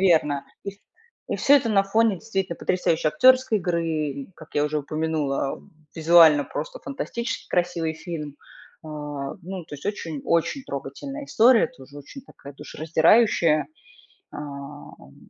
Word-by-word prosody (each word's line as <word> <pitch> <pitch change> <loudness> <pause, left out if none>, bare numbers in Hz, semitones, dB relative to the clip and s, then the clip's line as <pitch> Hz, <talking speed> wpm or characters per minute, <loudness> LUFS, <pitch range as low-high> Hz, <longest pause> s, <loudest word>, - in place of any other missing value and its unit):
верно. 155 -6 +2 0.2
И 200 - -3
в 200 - -23 0.5
и - - -1
всё 285 - +5
это 255 -4 0
на 200 -2 +4
фоне 220 +1 +2
действительно 195 -3 -3
потрясающей 165 -3 0
актёрской 255 +5 +4
игры, 170 -3 -1
и, 150 -2 -3
как 160 - -15
я 145 - +2
уже 150 +1 -1
упомянула, 150 -2 -2 0.3
визуально 160 -2 +6
просто - - -6
фантастически 260 -3 -5
красивый 175 -2 -1
фильм, 155 -4 -7 0.5
а, 160 - -11 0.5
ну, 185 0 -7
то 155 - -10
есть 140 - -9
очень 165 -8 -4
очень 170 - 0
трогательная 205 - -6
история, 235 -2 +4
тоже 145 - -15
очень 255 - -11
такая 140 - -13
душераздирающая. 160 +3 +2 0.7
Эм, 140 - -10
165 Hz, 135 wpm, -24 LUFS, 150-210 Hz, 0.7 s, визуально